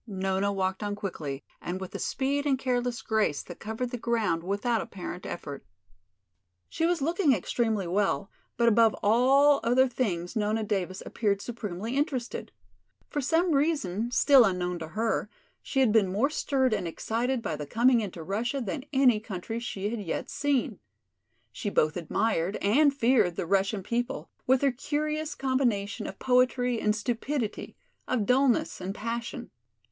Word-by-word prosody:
Nona 195 0 0
walked 190 0 -1
on 205 -1 -2
quickly 150 -9 -5 0.2
and 180 +2 -4
with 190 -1 -7
a - - -4
speed 280 +2 -1
and 270 -2 +3
careless 245 -3 -1
grace 215 -10 0
that 175 - -10
covered 225 +3 -4
the 245 - -4
ground 225 -8 0
without 205 +6 0
apparent 180 -1 -7
effort. 145 -5 -6 1.0
She 330 - 0
was 345 -5 0
looking 330 -1 +3
extremely 220 -1 0
well, 195 +2 0 0.3
but 235 - +3
above 230 -1 +5
all 270 +7 +5
other 250 +3 +4
things 200 -8 -2
Nona 215 +1 0
Davis 190 -3 -2
appeared 205 -3 0
supremely 220 0 -5
interested. 270 -4 -2 0.6
For 290 - -1
some 330 +6 +2
reason, 275 - +1
still 265 +1 +6
unknown 180 -3 0
to 160 - -6
her, 220 +3 -1 0.3
she 270 - 0
had 250 -5 +4
been 205 -4 +3
more 240 +10 +1
stirred 265 -5 +1
and 195 -5 -1
excited 235 +8 -2
by 155 - -2
the 150 -1 -6
coming 235 - +4
into 185 -5 -6
Russia 230 - -2
than 245 +3 -4
any 260 -5 +4
country 215 +2 -5
she 205 -3 -3
had 230 -2 -3
yet 175 - -4
seen. 285 -3 0 0.7
She 210 - -4
both 155 -5 +2
admired 175 +2 0
and 280 +9 +4
feared 240 -9 +2
the - - -2
Russian 195 +2 +1
people, 240 +4 -3 0.2
with 260 0 +4
their 280 -1 +3
curious 300 +4 -2
combination 250 -7 0
of 195 - -7
poetry 250 -1 +2
and 210 0 +2
stupidity, 235 +1 -3 0.3
of 230 -5 0
dullness 265 +2 +2
and 190 +2 -4
passion. 235 +2 -5
225 Hz, 160 wpm, -28 LUFS, 195-260 Hz, 1.0 s, still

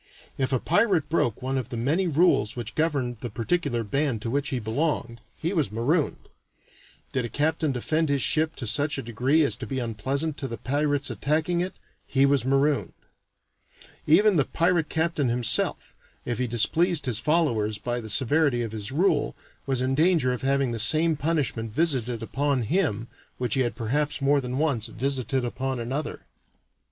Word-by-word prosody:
If 130 -1 -1
a 130 - +3
pirate 175 - +1
broke 125 -7 0
one 130 +1 -1
of 125 -2 -6
the 120 - -5
many 155 +11 +1
rules 160 -8 +2
which 120 -2 -5
governed 140 -7 -1
the 120 - -4
particular 120 +1 -1
band 130 0 -1
to 115 - -3
which 140 +1 -1
he 130 - -2
belonged, 115 0 -2 0.2
he 170 +4 -2
was 150 - 0
marooned; 140 +8 -1 0.9
did 130 - 0
a 120 - -4
captain 155 +2 0
defend 155 +5 0
his 140 -2 +1
ship 160 +1 +2
to 125 - -5
such 145 +6 +1
a 135 - -4
degree 125 +7 +2
as 115 -8 +1
to 125 -3 -7
be 135 - -4
unpleasant 130 +6 -2
to 140 - -3
the 115 -2 -6
pirates 145 0 -1
attacking 155 - 0
it, 185 +1 -3 0.3
he 135 0 +3
was 140 -3 +2
marooned; 135 +2 +1 1.1
even 195 +5 +5
the 140 - +3
pirate 170 -2 +1
captain 160 -5 0
himself, 120 -1 +1 0.3
if 120 -1 -3
he 125 - 0
displeased 150 - +3
his 120 -5 +1
followers 120 -10 +1
by 120 +3 -3
the 110 - -8
severity 130 +2 +2
of 115 - -5
his 105 0 -4
rule, 160 0 +1 0.3
was 135 -2 0
in 130 +1 0
danger 155 -4 +3
of 125 - -5
having 135 -1 +1
the 115 - -3
same 155 +8 +4
punishment 145 -8 -1
visited 125 -5 -1
upon 135 +1 0
him 115 - 0 0.3
which 125 -3 -2
he 135 - +2
had 120 -2 -1
perhaps 145 +6 -1
more 140 0 +2
than 125 0 -4
once 140 -7 +1
visited 130 0 -1
upon 130 +1 -3
another. 130 +6 -4
135 Hz, 180 wpm, -25 LUFS, 120-155 Hz, 1.1 s, even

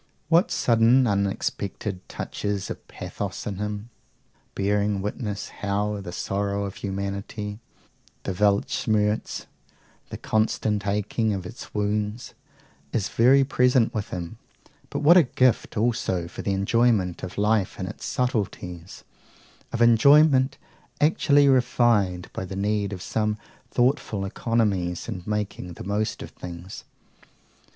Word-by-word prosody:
What 170 +7 +4
sudden, 120 +2 +4
unexpected 100 -1 -2
touches 100 -2 -3
of - - -8
pathos - - -6
in 100 -2 -4
him! 105 +2 -4 0.6
bearing 100 0 +1
witness 105 -1 -4
how 105 0 -2
the 90 - -7
sorrow 100 +2 -2
of 100 0 -7
humanity, 100 +2 -4 0.6
the 95 - -2
Weltschmerz, 105 +2 +1 0.6
the - - -6
constant 110 -1 0
aching 105 +1 0
of 95 -2 -5
its 115 +4 -10
wounds, 105 +2 -2 0.6
is 105 -3 -1
ever 135 +4 +6
present 125 -3 +3
with 105 -3 -3
him: 90 +5 -6 0.5
but - - -3
what 170 +5 +8
a - - +9 0.2
gift 130 -4 +2
also 105 -6 0
for - - -7
the 100 - -1
enjoyment 100 -2 +2
of 90 - -7
life 105 -1 +1
in 95 - -2
its 105 - -8
subtleties, 95 -8 -3 0.7
of 120 - +2
enjoyment 130 +3 +5 0.4
actually 145 -1 +4
refined 120 -8 +3
by - - -4
the 95 +1 -6
need 100 0 0
of 90 -2 -6
some 105 -1 -1 0.3
thoughtful 120 -5 +1
economies 95 -5 0
and 95 -5 -6
making 105 -4 -3
the - - -9
most 105 +3 -2
of - - -10
things! 90 +2 -9
105 Hz, 125 wpm, -25 LUFS, 100-115 Hz, 0.7 s, a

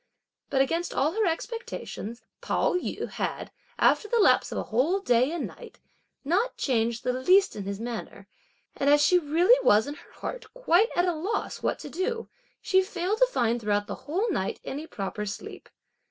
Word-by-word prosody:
But 270 -1 +2
against 335 +5 -2
all 295 +3 +2
her 430 +2 +1
expectations 325 - -5 0.2
Pao - - +1
yü 360 - -2
had, - - -4 0.3
after 425 - +3
the 470 - +1
lapse 435 - +4
of - - -4
a - - -1
whole 280 - +1
day 250 -5 +2
and 340 - -2
night, - - -11 0.5
not 390 - +1
changed 235 -3 0
the 250 - 0
least 370 +10 +4
in 200 - -5
his 200 0 -4
manner, 225 -4 -6 0.5
and 280 - +1
as 295 0 +5
she 360 - +5
really 350 +11 +4
was 215 +2 +5
in 285 - -5
her - - -16
heart 470 -3 -7
quite 450 -3 +3
at 350 - +3
a 355 - +1
loss 350 +8 -3
what - - 0
to - - -9
do, 455 +6 -2 0.4
she 380 0 +4
failed 380 +2 -2
to - - +6
find 235 - 0
throughout 205 -1 0
the - - -5 0.2
whole 380 +9 +1
night 190 - -2
any 295 +4 -5
proper 200 -2 -4
sleep. 195 - -8
320 Hz, 185 wpm, -27 LUFS, 235-390 Hz, 0.5 s, to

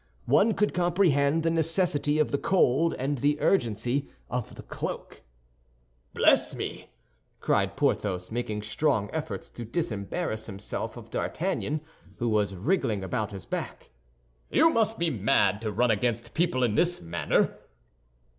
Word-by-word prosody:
One 225 - +4
could 210 - +1
comprehend 165 -4 +2
the 165 - +2
necessity 165 -2 +1
of 155 - +2
the 140 - 0
cold 165 -3 +3
and 135 +1 -2
the 145 +3 +1
urgency 125 - +1 0.2
of 125 -3 -3
the - - -10
cloak. - - -6 0.9
"Bless - - +4
me!" - - -6 0.5
cried - - +1
Porthos, 90 -2 0
making 110 -3 -3
strong 110 -1 0
efforts 150 -12 -4
to 120 - -7
disembarrass 110 - -3
himself 100 -1 -5
of - - -11
D'Artagnan, 150 +1 -2 0.4
who 120 - 0
was 105 -3 +1
wriggling 115 - 0
about 105 +1 -2
his 95 -3 -8
back; - - -5 0.6
"you 325 +3 +5
must 225 -3 +1
be 170 -1 0
mad 105 -2 +2
to 110 -2 -2
run 120 +3 +2
against 115 +2 -1
people 160 -7 +1
in 115 -4 +2
this 175 +9 +2
manner." 85 0 0
125 Hz, 140 wpm, -27 LUFS, 105-165 Hz, 0.9 s, you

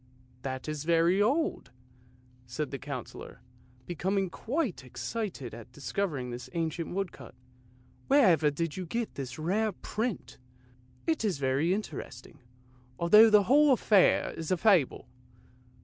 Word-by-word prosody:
" 125 0 -31
That 130 0 -5
is 155 -1 -4
very 170 +4 +3
old," 285 +10 0 0.8
said 135 +5 -4
the 135 - -5
Councillor, - - -8 0.4
becoming 190 +2 -1
quite 245 - -3
excited 155 - -5
at 115 -1 -11
discovering 140 -1 -3
this 120 +1 -7
ancient 165 0 -2
woodcut. 195 -9 -5 0.4
" 125 0 -31
Wherever 190 - +5
did 155 +2 -3
you 185 -2 -5
get 230 +5 -3
this 130 -3 -6
rare 200 +8 0
print? 220 - -4 0.7
It 320 -7 0
is 200 -8 0
very 140 +5 +1
interesting, 195 -6 -5 0.6
although 210 +6 +7
the 210 -1 +6
whole 280 +6 +5
affair 210 -5 +3
is 165 -1 -6
a 185 - +2
fable. 175 - +2
170 Hz, 135 wpm, -29 LUFS, 140-210 Hz, 0.8 s, although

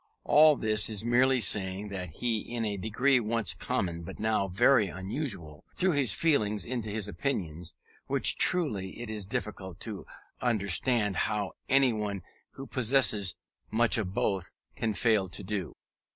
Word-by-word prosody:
All 155 0 +6
this 110 -3 +1
is 110 0 -2
merely 125 +2 +3
saying 100 -1 0
that 90 -3 -5
he, 115 +8 -2
in 115 +1 -4
a 105 -1 -2
degree 120 +7 +1
once 115 -2 0
common, 85 -2 -3
but 85 - -9
now 110 -2 0
very 115 +3 +3
unusual, 95 - -5
threw 185 0 +1
his 140 - +2
feelings 105 - +1
into 120 -2 -4
his 105 -1 -3
opinions; 90 - -4 0.3
which - - +5
truly 110 - +3
it 120 -2 -6
is 105 -3 -6
difficult 95 -3 -5
to - - -7 0.3
understand 105 -1 +1
how 105 -2 -1 0.2
anyone 110 -8 +1 0.3
who 135 - -9
possesses 120 -7 +2 0.3
much 115 +1 +2
of 95 -4 -3
both, 95 -2 -2 0.2
can 110 -2 -2
fail 110 -4 +2
to 95 +3 -7
do. 95 -5 -4
105 Hz, 150 wpm, -28 LUFS, 95-120 Hz, 0.3 s, All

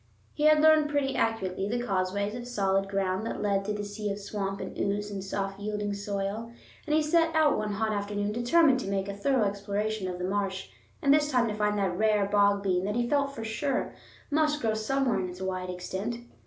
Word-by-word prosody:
He 300 - -1
had 305 0 +6
learned 310 -1 +5
pretty 285 -2 0
accurately 195 -3 -1
the 240 +2 0
causeways 200 0 -1
of 240 0 -6
solid 195 -4 0
ground 195 0 -1
that - - -4
lead 200 -1 +1
through 210 +1 -2
the 205 - -3
sea 205 +1 -4
of 200 - -2
swamp 195 -1 -4
and - - -6
ooze 205 +1 -1
and 195 -2 -4
soft 195 0 -3
yielding 210 0 -2
soil, 200 +2 -3 0.4
and 300 - +2
he 310 - +3
set 325 +1 +2
out 310 -2 +4
one 210 -1 -2
hot 220 +1 0
afternoon 205 0 -2
determined 260 +5 +4
to 195 - -4
make 195 0 -1
a 200 - -3
thorough 255 +3 +2
exploration 200 0 -2
of 180 -1 -4
the 180 - -3
marsh, 195 0 -2 0.3
and 280 -1 +6
this 295 0 +3
time 250 -4 +2
to - - -2
find 210 0 0
that 190 -3 0
rare 210 0 +2
Bog 200 0 +3
Bean, 185 -2 +1
that 210 +1 -1
he 240 0 +1
felt 280 +1 +1
sure, 255 +5 -1 0.4
must 305 0 +2
grow 225 -5 0
somewhere 240 +1 0
in 185 -1 -2
its 180 +1 -9
wide 185 -1 -3
extent. 190 +5 -4
205 Hz, 215 wpm, -28 LUFS, 195-240 Hz, 0.4 s, had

